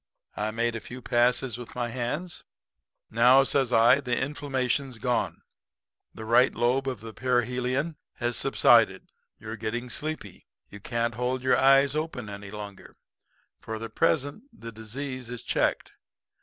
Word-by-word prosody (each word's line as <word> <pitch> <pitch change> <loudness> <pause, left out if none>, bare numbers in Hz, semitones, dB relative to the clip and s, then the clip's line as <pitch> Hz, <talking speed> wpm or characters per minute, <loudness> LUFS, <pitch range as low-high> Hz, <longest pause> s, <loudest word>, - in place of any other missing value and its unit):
"I 105 +1 -1
made 115 +1 -1
a - - -3
few 125 +3 -9
passes 120 0 +1
with 120 - -10
my 120 -1 -2
hands. 130 +9 -3 0.7
"'Now,' 125 +4 +6
says 135 -2 +1
I, 120 +3 +6
'the 125 -3 -1
inflammation's 135 -2 -2
gone. 110 -7 -1 0.7
The 110 - -7
right 120 +3 +4
lobe 125 +4 +1
of 125 -6 -3
the 115 0 -9
perihelion 125 +5 0 0.2
has 120 0 -2
subsided. - - +4 0.3
You're 110 +1 -7
getting 120 +2 -4
sleepy. 145 - -5 0.2
You 105 - -10
can't 115 +2 -1
hold 125 +2 -2
your 130 - +4
eyes 135 +1 +5
open 150 -8 -4
any 100 0 -8
longer. 105 -1 -9 0.6
For 110 - -6
the 115 +1 -7
present 145 - 0
the 115 0 -9
disease 125 +3 -6
is 125 -1 -7
checked. - - 0
125 Hz, 145 wpm, -27 LUFS, 115-130 Hz, 0.7 s, Now